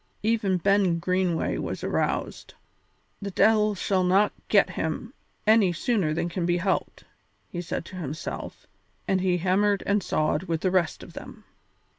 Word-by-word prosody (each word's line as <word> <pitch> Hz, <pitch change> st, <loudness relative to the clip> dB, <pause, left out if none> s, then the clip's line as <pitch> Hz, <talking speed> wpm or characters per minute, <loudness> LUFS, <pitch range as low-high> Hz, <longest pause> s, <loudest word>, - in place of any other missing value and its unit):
Even 215 Hz, -4 st, +1 dB
Ben 195 Hz, -1 st, +2 dB
Greenway 180 Hz, -1 st, 0 dB
was -, -, -4 dB
aroused. -, -, -2 dB, 0.7 s
"The 200 Hz, -, -4 dB
de'il 210 Hz, +1 st, +3 dB
shall 190 Hz, 0 st, 0 dB
not 195 Hz, +3 st, +3 dB
get 200 Hz, -3 st, +4 dB
him 170 Hz, +8 st, -4 dB, 0.3 s
any 215 Hz, -4 st, +5 dB
sooner 185 Hz, -2 st, 0 dB
than 165 Hz, +2 st, -1 dB
can 175 Hz, 0 st, -2 dB
be 175 Hz, 0 st, +2 dB
helped," 190 Hz, +2 st, -2 dB, 0.5 s
he 175 Hz, -, -4 dB
said 170 Hz, -, -4 dB
to 185 Hz, -, -10 dB
himself, 155 Hz, -2 st, -6 dB, 0.4 s
and 190 Hz, -1 st, +1 dB
he 180 Hz, -1 st, +2 dB
hammered 195 Hz, +3 st, +1 dB
and 205 Hz, 0 st, +2 dB
sawed 155 Hz, -3 st, 0 dB
with 165 Hz, -2 st, -2 dB
the 185 Hz, -, +1 dB
rest 180 Hz, -3 st, 0 dB
of -, -, -12 dB
them. -, -, -10 dB
185 Hz, 155 wpm, -26 LUFS, 175-205 Hz, 0.7 s, any